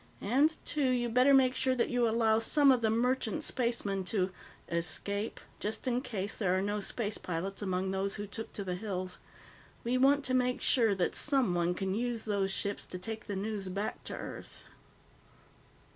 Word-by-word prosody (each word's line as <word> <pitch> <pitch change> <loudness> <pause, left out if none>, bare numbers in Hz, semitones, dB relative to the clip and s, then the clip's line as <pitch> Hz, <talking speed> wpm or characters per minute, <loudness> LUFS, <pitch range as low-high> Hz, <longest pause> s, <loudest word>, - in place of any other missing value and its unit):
"And, 285 +9 +3
too, 285 -3 +1
you'd 240 -2 0
better 255 +3 +5
make 265 -2 +5
sure 260 0 +1
that 245 - 0
you 245 -2 +2
allow 220 -1 +3
some 275 +5 +4
of 250 -2 +3
the 220 - +2
merchant 240 0 +1
spacemen 230 -6 -1
to 190 -1 0 0.4
'escape,' 200 +5 -1 0.2
just 215 +5 -3
in 250 0 +1
case 205 -5 -3
there 185 -3 +1
are - - +1
no 205 +1 -1
space 210 +1 -3
pilots 185 +4 -4
among 190 -1 -1
those 195 +1 -1
who 205 - -4
took 220 +2 -6
to 200 - -4
the 185 -2 -3
hills. 185 -1 -4 0.6
We 245 +2 +1
want 280 +2 +4
to 255 - 0
make 250 0 +2
sure 225 -5 +3
that 180 -2 0
someone 180 -12 +2
can 190 0 -2
use 235 +1 -2
those 200 -2 0
ships 200 +1 -2
to 180 - -5
take 220 +4 -6
the 200 - -3
news 200 -1 -3
back 200 +3 -3
to - - -5
Earth." - - -8
220 Hz, 185 wpm, -31 LUFS, 195-250 Hz, 0.6 s, better